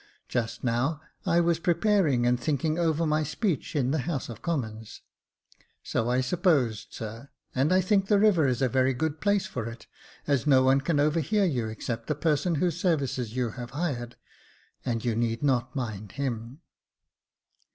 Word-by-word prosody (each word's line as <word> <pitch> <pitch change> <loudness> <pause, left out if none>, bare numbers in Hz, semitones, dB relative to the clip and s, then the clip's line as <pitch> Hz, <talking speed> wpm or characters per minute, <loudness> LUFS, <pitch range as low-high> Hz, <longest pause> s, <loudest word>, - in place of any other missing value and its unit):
Just 115 -2 -2
now 130 +6 0 0.3
I 170 - +4
was 170 -1 +2
preparing 170 - +2
and 120 0 +2
thinking 155 +5 0
over 165 -1 +1
my 155 0 +2
speech 155 +3 -2
in 135 -3 +1
the 155 - +1
House 135 -1 -3
of 115 - -8
Commons." 110 -9 -4 0.4
" - - -34
So 115 0 -1
I 125 +1 +2
supposed, 130 - +1
sir, 115 +5 -8 0.2
and 135 +6 +1
I 185 +1 +5
think 195 +1 +2
the 205 - +4
river 200 -8 +4
is 125 0 0
a - - +4
very 130 +1 +2
good 155 +3 -2
place 205 -1 +2
for 120 -3 -4
it, 115 0 -11 0.4
as 140 -1 +1
no 130 -2 +6
one 135 +1 +4
can 145 +1 0
overhear 160 +7 +2
you 125 -10 0
except 115 +1 -5
the 150 - 0
person 160 +3 +1
whose 175 +3 0
services 135 - 0
you 125 -3 0
have 120 +1 -7
hired 125 -8 -2 0.4
— - - -34
and 120 -2 -2
you 115 -2 +1
need 115 +2 -1
not 130 -1 +1
mind 110 -6 -4
him." 125 +1 -4
135 Hz, 180 wpm, -27 LUFS, 120-165 Hz, 0.4 s, no